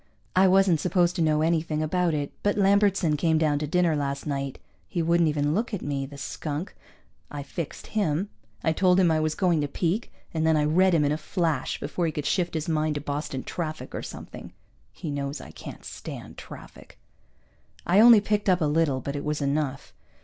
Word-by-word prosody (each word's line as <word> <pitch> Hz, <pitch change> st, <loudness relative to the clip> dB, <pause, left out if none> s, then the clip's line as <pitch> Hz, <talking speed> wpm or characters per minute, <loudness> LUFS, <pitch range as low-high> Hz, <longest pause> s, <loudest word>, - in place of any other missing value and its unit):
I 190 Hz, +1 st, +6 dB
wasn't 185 Hz, -3 st, +4 dB
supposed 175 Hz, +1 st, +2 dB
to -, -, 0 dB
know 155 Hz, -1 st, +2 dB
anything 160 Hz, -1 st, 0 dB
about 170 Hz, +1 st, +1 dB
it, 145 Hz, -1 st, -3 dB
but 205 Hz, 0 st, +1 dB
Lambertson 195 Hz, -5 st, +3 dB
came 160 Hz, +1 st, +2 dB
down 150 Hz, -2 st, +2 dB
to 150 Hz, -, -3 dB
dinner 175 Hz, 0 st, +2 dB
last 140 Hz, -1 st, -2 dB
night. 140 Hz, -2 st, -3 dB, 0.3 s
He 180 Hz, -, -4 dB
wouldn't 170 Hz, 0 st, +3 dB
even 145 Hz, 0 st, 0 dB
look 220 Hz, +3 st, -1 dB
at 190 Hz, -, -7 dB
me, 140 Hz, -1 st, -2 dB
the 140 Hz, +1 st, -11 dB
skunk. 150 Hz, +4 st, -5 dB, 0.5 s
I 145 Hz, -1 st, -6 dB
fixed 150 Hz, +2 st, -6 dB
him. 195 Hz, -2 st, -1 dB, 0.3 s
I 160 Hz, -, +2 dB
told 180 Hz, +2 st, +3 dB
him 175 Hz, -3 st, +4 dB
I 160 Hz, -, +2 dB
was 155 Hz, 0 st, 0 dB
going 175 Hz, -5 st, +2 dB
to 145 Hz, -, -1 dB
peek, 175 Hz, +9 st, -2 dB, 0.2 s
and 160 Hz, -1 st, 0 dB
then 160 Hz, -1 st, +3 dB
I 150 Hz, -, +2 dB
read 180 Hz, +4 st, +4 dB
him 150 Hz, -2 st, +3 dB
in 145 Hz, -, +1 dB
a 150 Hz, -, -1 dB
flash, 160 Hz, -5 st, -1 dB
before 175 Hz, -2 st, -2 dB
he -, -, -1 dB
could 150 Hz, -1 st, -4 dB
shift 175 Hz, -3 st, 0 dB
his 160 Hz, -1 st, -2 dB
mind 155 Hz, -1 st, 0 dB
to 145 Hz, -, -3 dB
Boston 145 Hz, -2 st, -4 dB
traffic 155 Hz, -3 st, -5 dB
or -, -, -3 dB
something. -, -, -9 dB, 0.4 s
(He 155 Hz, -, -6 dB
knows 140 Hz, 0 st, -3 dB
I -, -, -10 dB
can't -, -, -10 dB
stand -, -, -8 dB
traffic.) -, -, -12 dB, 0.9 s
I 185 Hz, +4 st, +4 dB
only 230 Hz, -1 st, +8 dB
picked 205 Hz, 0 st, 0 dB
up 180 Hz, -1 st, +4 dB
a 160 Hz, -, +1 dB
little, 150 Hz, -3 st, +1 dB
but 140 Hz, +3 st, -4 dB
it 145 Hz, -, -4 dB
was 150 Hz, 0 st, -1 dB
enough. 140 Hz, -1 st, -2 dB
160 Hz, 210 wpm, -26 LUFS, 145-180 Hz, 0.9 s, only